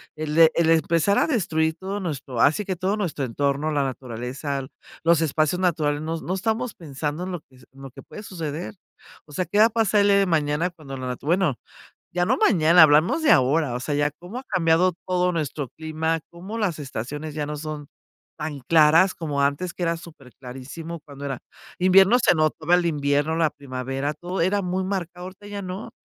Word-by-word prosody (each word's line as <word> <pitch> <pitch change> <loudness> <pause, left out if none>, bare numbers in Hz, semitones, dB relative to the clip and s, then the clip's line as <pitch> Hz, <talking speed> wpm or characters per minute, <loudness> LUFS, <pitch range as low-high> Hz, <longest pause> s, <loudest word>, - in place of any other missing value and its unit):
el 155 -1 -4
e 160 -1 +8
el 165 -1 +3
empezar 165 +4 +3
a - - +2
destruir 160 - 0
todo 195 +3 -4
nuestro 145 - -5
así, 155 +8 +3
que 185 - -2
todo 190 +3 0
nuestro 170 -9 -2
entorno, 140 +5 -1
la 145 -2 +1
naturaleza, 130 +2 -4 0.4
los 165 -1 +4
espacios 155 +2 +1
naturales, 155 -5 0
no 160 +1 -3
no 180 - -3
estamos 220 +4 -1
pensando 150 +1 -5
en 185 - -5
lo 175 - -5
que 130 -3 -23
se 120 - -19
en 135 - -15
lo 135 -1 -9
que - - -12
puede 210 - -11
suceder. 165 -1 -5 0.5
O 150 - -16
sea, 180 +5 -1
¿qué 205 - 0
va 215 - +8
a - - +3
pasar 215 -2 +2
el 200 - +3
día 200 -1 +5
de 195 - +3
mañana 160 0 +1
cuando 150 -6 -10
la 130 0 -5
natu-? 125 +2 -6
Bueno, 170 -4 +2 0.6
ya 175 0 +1
no - - +2
mañana, 170 -2 +5
hablamos 155 - +5
de 310 - +4
ahora, 135 +1 +3
o 125 - -3
sea, 140 +3 -2
ya 145 0 +1
cómo 175 +10 -9
ha 260 - -9
cambiado 180 0 +2
todo 180 -1 +1
nuestro 150 -4 -3
clima, 160 +1 -2
cómo 185 +6 -7
las 190 -8 -1
estaciones 145 +3 -6
ya 150 -1 -3
no 150 0 -4
son 150 -1 -6 0.5
tan 150 -2 -5
claras 160 +6 +5
como 145 -4 -2
antes, 145 +6 -1
que - - -6
era 170 -1 +1
superclarísimo, 145 +1 -10
cuando 145 -1 -11
era 135 -3 -3 0.4
invierno, 190 +5 +6
se 240 - +4
notaba 155 +1 +1
el 180 -1 +3
invierno, 145 0 0
la 165 -2 +2
primavera, 135 +1 -4
todo 180 +4 -5
era 195 +4 +1
muy 185 +1 -1
marcado, 180 -2 -4
ahorita 190 +2 -11
ya 205 -1 -6
no. 185 +3 -6
160 Hz, 205 wpm, -24 LUFS, 145-180 Hz, 0.6 s, e